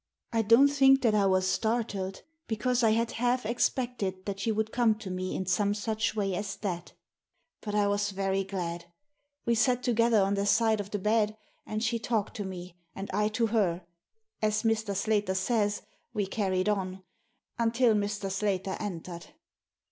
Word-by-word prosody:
I 225 Hz, -, +3 dB
don't 230 Hz, +6 st, +6 dB
think 270 Hz, -1 st, +5 dB
that 225 Hz, -3 st, +4 dB
I 205 Hz, -2 st, +3 dB
was 185 Hz, -1 st, +2 dB
startled, 215 Hz, -3 st, -1 dB, 0.2 s
because 240 Hz, +3 st, 0 dB
I 225 Hz, -, +4 dB
had 230 Hz, +1 st, +1 dB
half 245 Hz, +1 st, 0 dB
expected 235 Hz, -5 st, -1 dB
that 195 Hz, -1 st, -4 dB
she 225 Hz, -, 0 dB
would 220 Hz, 0 st, -1 dB
come 235 Hz, -3 st, +3 dB
to 210 Hz, -3 st, -7 dB
me 185 Hz, 0 st, -3 dB
in 190 Hz, -, -2 dB
some 200 Hz, +3 st, +1 dB
such 220 Hz, +1 st, -1 dB
way 200 Hz, -3 st, 0 dB
as 195 Hz, +2 st, -3 dB
that 175 Hz, -4 st, -5 dB, 0.7 s
But 210 Hz, -1 st, -4 dB
I 205 Hz, -1 st, +3 dB
was 205 Hz, 0 st, +1 dB
very 195 Hz, 0 st, -1 dB
glad. 175 Hz, -3 st, -4 dB, 0.6 s
We 235 Hz, -, +2 dB
sat 245 Hz, +2 st, +2 dB
together 230 Hz, -2 st, +3 dB
on 195 Hz, 0 st, +2 dB
the 200 Hz, 0 st, 0 dB
side 220 Hz, 0 st, +3 dB
of 200 Hz, -1 st, -5 dB
the 205 Hz, -, -2 dB
bed, 215 Hz, +1 st, +1 dB, 0.3 s
and 215 Hz, +1 st, -2 dB
she 230 Hz, 0 st, 0 dB
talked 225 Hz, -3 st, -1 dB
to 205 Hz, -, -3 dB
me 180 Hz, -2 st, -8 dB, 0.2 s
and 195 Hz, +1 st, -6 dB
I 210 Hz, +2 st, +2 dB
to 220 Hz, +2 st, 0 dB
her 180 Hz, -5 st, +1 dB, 0.3 s
— 440 Hz, 0 st, -52 dB
as 215 Hz, +1 st, +1 dB
Mr. 220 Hz, -3 st, 0 dB
Slater 205 Hz, -1 st, 0 dB
says, 205 Hz, +1 st, 0 dB, 0.3 s
we 205 Hz, -2 st, +1 dB
carried 190 Hz, -1 st, -1 dB
on 190 Hz, -2 st, -1 dB, 0.3 s
— 245 Hz, +1 st, -36 dB
until 230 Hz, 0 st, +3 dB
Mr. 205 Hz, -1 st, -1 dB
Slater 195 Hz, -1 st, -1 dB
entered." 175 Hz, -4 st, -6 dB
210 Hz, 180 wpm, -29 LUFS, 195-225 Hz, 0.7 s, don't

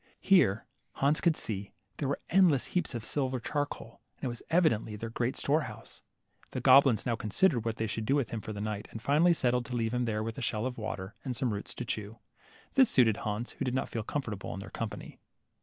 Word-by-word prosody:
Here, 145 Hz, -, +4 dB, 0.3 s
Hans 145 Hz, +3 st, +1 dB
could 170 Hz, -3 st, +3 dB
see, 100 Hz, -2 st, -4 dB, 0.2 s
there 140 Hz, -, -1 dB
were 140 Hz, -, -1 dB
endless 175 Hz, -7 st, +5 dB
heaps 180 Hz, -8 st, 0 dB
of 115 Hz, -1 st, -4 dB
silver 130 Hz, -3 st, -1 dB
charcoal, 145 Hz, +3 st, -4 dB, 0.2 s
and -, -, -24 dB
it -, -, 0 dB
was 120 Hz, -1 st, -6 dB
evidently 155 Hz, -11 st, +2 dB
their 115 Hz, +2 st, -6 dB
great 120 Hz, +2 st, -1 dB
store 150 Hz, +3 st, +2 dB
house. -, -, -12 dB, 0.5 s
The -, -, -2 dB
goblins 130 Hz, -4 st, +6 dB
now 120 Hz, -2 st, +1 dB
considered 115 Hz, -, +2 dB
what 115 Hz, -1 st, -1 dB
they 110 Hz, -, -2 dB
should 110 Hz, 0 st, -3 dB
do 140 Hz, -, +3 dB
with 140 Hz, -6 st, 0 dB
him 115 Hz, -2 st, -3 dB
for 110 Hz, -, -6 dB
the 105 Hz, -1 st, -5 dB
night, 105 Hz, -1 st, -3 dB
and 115 Hz, -, -7 dB
finally 150 Hz, +9 st, +4 dB
settled 125 Hz, -3 st, +1 dB
to 125 Hz, -, -4 dB
leave 115 Hz, -1 st, 0 dB
him 125 Hz, 0 st, +1 dB
there 110 Hz, -2 st, -1 dB
with 115 Hz, +3 st, -4 dB
a -, -, -5 dB
shell 110 Hz, -1 st, -1 dB
of 125 Hz, -2 st, -4 dB
water, 100 Hz, -3 st, -5 dB
and 130 Hz, -3 st, -3 dB
some 120 Hz, -1 st, 0 dB
roots 100 Hz, -, -5 dB
to 125 Hz, -, -5 dB
chew. 110 Hz, -3 st, -4 dB, 0.6 s
This 265 Hz, -3 st, +6 dB
suited 115 Hz, -5 st, +4 dB
Hans, 105 Hz, +3 st, -3 dB
who -, -, -5 dB
did 125 Hz, 0 st, -1 dB
not 130 Hz, -, -1 dB
feel 115 Hz, -, -3 dB
comfortable 110 Hz, -4 st, -4 dB
in -, -, -6 dB
their 100 Hz, -, -9 dB
company. 115 Hz, -2 st, -6 dB
120 Hz, 230 wpm, -30 LUFS, 110-140 Hz, 0.6 s, goblins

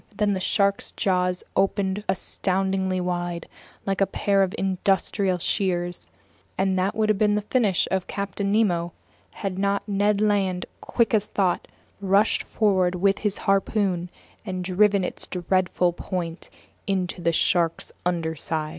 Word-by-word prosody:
Then 205 Hz, -1 st, +1 dB
the 190 Hz, -, -1 dB
shark's 200 Hz, +1 st, +1 dB
jaws 180 Hz, -1 st, 0 dB
opened 195 Hz, 0 st, +1 dB
astoundingly 190 Hz, 0 st, 0 dB
wide, 175 Hz, -1 st, -3 dB, 0.4 s
like 195 Hz, 0 st, -1 dB
a 195 Hz, -, +4 dB
pair 200 Hz, -1 st, +1 dB
of 190 Hz, -1 st, +1 dB
industrial 190 Hz, 0 st, +1 dB
shears, 175 Hz, -1 st, -1 dB, 0.5 s
and 190 Hz, 0 st, +1 dB
that 190 Hz, +2 st, 0 dB
would 220 Hz, -1 st, +1 dB
have 210 Hz, -2 st, +2 dB
been 210 Hz, -1 st, +3 dB
the 210 Hz, -, -1 dB
finish 210 Hz, -5 st, +2 dB
of 190 Hz, -1 st, 0 dB
Captain 200 Hz, 0 st, -2 dB
Nemo 175 Hz, -6 st, +1 dB, 0.4 s
had 190 Hz, -3 st, -4 dB
not 200 Hz, +1 st, 0 dB
Ned 205 Hz, 0 st, +2 dB
Land, 195 Hz, -4 st, +1 dB, 0.2 s
quick 235 Hz, -1 st, +1 dB
as 210 Hz, -1 st, +2 dB
thought, 185 Hz, -3 st, 0 dB, 0.3 s
rushed 200 Hz, +2 st, +3 dB
forward 185 Hz, -4 st, +2 dB
with 195 Hz, +2 st, +2 dB
his 210 Hz, -2 st, -1 dB
harpoon 195 Hz, -3 st, +1 dB, 0.3 s
and 185 Hz, -1 st, -4 dB
driven 195 Hz, +2 st, +3 dB
its -, -, -5 dB
dreadful 180 Hz, -1 st, +1 dB
point 175 Hz, -2 st, -4 dB, 0.4 s
into 185 Hz, -2 st, -1 dB
the 170 Hz, -, +2 dB
shark's 165 Hz, 0 st, +1 dB
underside. 160 Hz, -2 st, -2 dB
190 Hz, 140 wpm, -24 LUFS, 180-200 Hz, 0.5 s, a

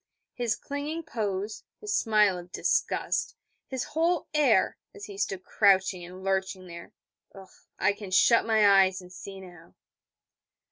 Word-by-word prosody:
His 240 Hz, -3 st, -1 dB
clinging 295 Hz, +4 st, -5 dB
pose, 210 Hz, -7 st, -4 dB, 0.2 s
his 420 Hz, -1 st, -4 dB
smile 210 Hz, -4 st, +3 dB
of 175 Hz, 0 st, -12 dB
disgust, -, -, 0 dB, 0.3 s
his 260 Hz, -2 st, -3 dB
whole 330 Hz, +2 st, 0 dB
air, 275 Hz, -10 st, +3 dB, 0.2 s
as 205 Hz, -, -8 dB
he 200 Hz, -, -10 dB
stood 195 Hz, -1 st, -3 dB
crouching 190 Hz, -3 st, +2 dB
and 180 Hz, +2 st, -10 dB
lurching 190 Hz, -1 st, -1 dB
there, 170 Hz, -1 st, -10 dB, 0.9 s
I 195 Hz, +2 st, +3 dB
can 205 Hz, -1 st, -9 dB
shut 230 Hz, +5 st, +5 dB
my 220 Hz, -2 st, +4 dB
eyes, 190 Hz, 0 st, +1 dB
and 180 Hz, 0 st, -13 dB
see 195 Hz, +1 st, -9 dB
now. 175 Hz, -, -14 dB
200 Hz, 140 wpm, -27 LUFS, 185-230 Hz, 0.9 s, shut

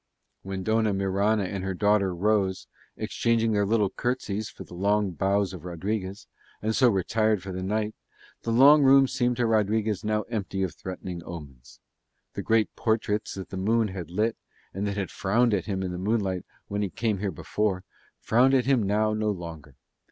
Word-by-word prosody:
When 95 Hz, -1 st, -5 dB
Dona 110 Hz, -1 st, +2 dB
Mirana 100 Hz, +2 st, +1 dB
and 95 Hz, 0 st, -4 dB
her 95 Hz, -1 st, -2 dB
daughter 100 Hz, 0 st, +2 dB
rose, 95 Hz, 0 st, +1 dB, 0.3 s
exchanging 115 Hz, -1 st, +1 dB
their 100 Hz, -1 st, +1 dB
little 105 Hz, -2 st, +2 dB
curtsies 110 Hz, -4 st, -2 dB
for -, -, -10 dB
the -, -, -14 dB
low 100 Hz, +4 st, +2 dB
bows 100 Hz, +1 st, 0 dB
of 90 Hz, -4 st, -9 dB
Rodriguez, 95 Hz, +3 st, -4 dB, 0.3 s
and 110 Hz, +1 st, -1 dB
so 130 Hz, -3 st, +5 dB
retired 110 Hz, 0 st, +1 dB
for 95 Hz, -, -6 dB
the 95 Hz, 0 st, -4 dB
night, 105 Hz, +3 st, -1 dB, 0.5 s
the -, -, -4 dB
long 140 Hz, +6 st, +7 dB
room 135 Hz, 0 st, +6 dB
seemed 125 Hz, -1 st, 0 dB
to 120 Hz, -, +2 dB
Rodriguez 110 Hz, -1 st, +1 dB
now 105 Hz, 0 st, 0 dB
empty 100 Hz, -3 st, -3 dB
of 90 Hz, -, -2 dB
threatening 90 Hz, -1 st, -6 dB
omens. 70 Hz, -8 st, -10 dB, 0.5 s
The -, -, -4 dB
great 110 Hz, -1 st, +1 dB
portraits 110 Hz, -2 st, -1 dB
that 95 Hz, -1 st, -7 dB
the 95 Hz, -, -6 dB
moon 110 Hz, +3 st, +2 dB
had 95 Hz, -3 st, -6 dB
lit, 110 Hz, +6 st, 0 dB, 0.4 s
and 100 Hz, +2 st, -2 dB
that 100 Hz, 0 st, -3 dB
had 100 Hz, -2 st, -3 dB
frowned 115 Hz, +4 st, +2 dB
at 100 Hz, -, 0 dB
him 95 Hz, -2 st, -2 dB
in 90 Hz, -, -3 dB
the 90 Hz, -, -5 dB
moonlight 95 Hz, -3 st, -1 dB, 0.2 s
when 100 Hz, +1 st, -2 dB
he 100 Hz, -, -1 dB
came 110 Hz, 0 st, -1 dB
here 100 Hz, 0 st, -1 dB
before, 95 Hz, +3 st, -2 dB, 0.4 s
frowned 130 Hz, +4 st, +4 dB
at 130 Hz, -, +2 dB
him 135 Hz, -3 st, +3 dB
now 105 Hz, +2 st, +1 dB
no 110 Hz, 0 st, 0 dB
longer. 80 Hz, -7 st, -6 dB
105 Hz, 185 wpm, -26 LUFS, 95-110 Hz, 0.5 s, long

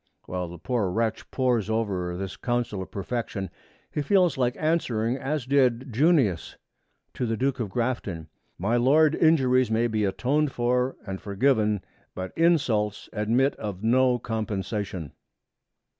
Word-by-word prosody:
While 90 Hz, -1 st, -3 dB
the 85 Hz, +1 st, -9 dB
poor 110 Hz, +1 st, -1 dB
wretch 110 Hz, +3 st, -2 dB
pores 125 Hz, -5 st, 0 dB
over 95 Hz, -6 st, -1 dB
this 95 Hz, 0 st, -5 dB
counsel 120 Hz, -5 st, -2 dB
of 95 Hz, -, -7 dB
perfection, 100 Hz, -1 st, -4 dB, 0.4 s
he 150 Hz, -, -1 dB
feels 180 Hz, +2 st, +3 dB
like 125 Hz, -1 st, 0 dB
answering 125 Hz, -8 st, 0 dB
as 135 Hz, +1 st, -2 dB
did 130 Hz, -2 st, +2 dB
Junius 135 Hz, -, +2 dB, 0.6 s
to 125 Hz, -, -2 dB
the 115 Hz, 0 st, -1 dB
Duke 135 Hz, +2 st, 0 dB
of 110 Hz, -4 st, -2 dB
Grafton, 105 Hz, -8 st, -2 dB, 0.3 s
'My 110 Hz, +7 st, +1 dB
Lord, 150 Hz, +5 st, +4 dB
injuries 130 Hz, -7 st, +3 dB
may 115 Hz, +1 st, +2 dB
be 110 Hz, -2 st, 0 dB
atoned 135 Hz, +9 st, +1 dB
for 125 Hz, +1 st, 0 dB
and 95 Hz, -2 st, -5 dB
forgiven, 105 Hz, -1 st, +1 dB, 0.3 s
but 95 Hz, 0 st, -5 dB
insults 130 Hz, -12 st, +1 dB
admit 115 Hz, +6 st, +1 dB
of 105 Hz, -2 st, -6 dB
no 125 Hz, +2 st, +3 dB
compensation.' 105 Hz, -, -3 dB
115 Hz, 140 wpm, -26 LUFS, 105-130 Hz, 0.6 s, Lord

